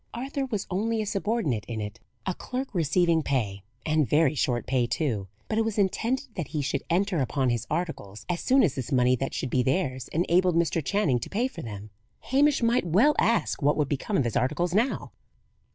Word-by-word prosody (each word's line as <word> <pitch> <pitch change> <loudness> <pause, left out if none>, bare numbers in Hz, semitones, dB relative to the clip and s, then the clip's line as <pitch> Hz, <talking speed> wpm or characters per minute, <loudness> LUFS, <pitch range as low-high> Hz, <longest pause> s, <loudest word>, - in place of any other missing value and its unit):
Arthur 270 +3 -3
was 210 -6 -2
only 220 +5 0
a 215 - -1
subordinate 195 - -1
in 115 -2 -5
it, 105 +2 -6 0.3
a 185 - 0
clerk 255 +6 -5
receiving 170 0 +2
pay 110 -10 -1 0.2
and 155 -3 +2
very 150 -1 +4
short 125 -4 0
pay, 125 -2 +1
too; 115 -10 -1 0.2
but 220 - 0
it - - +3
was 225 -1 -3
intended 230 +7 0
that 170 -6 -4
he 150 -1 -2
should 140 0 -1
enter 185 0 +1
upon 130 -1 +1
his 120 -2 -2
articles 155 - -4
as 175 -1 -1
soon 265 +1 +4
as 150 - +2
this 130 -4 -5
money 125 -1 +4
that 135 +2 -3
should 130 - -3
be 130 - +3
theirs 130 -1 -1
enabled 175 +2 +2
Mr. 165 -1 +1
Channing 155 -9 +1
to - - -7
pay 235 +5 0
for 175 -10 -9
them. 105 -2 -8 0.4
Hamish 280 -1 +4
might 235 -2 +3
well 220 - +4
ask 230 -6 +1
what 145 +1 +3
would 150 -3 +1
become 170 +9 -1
of - - +3
his 120 -3 -2
articles 170 +7 0
now! 230 +7 0
165 Hz, 205 wpm, -27 LUFS, 130-210 Hz, 0.4 s, very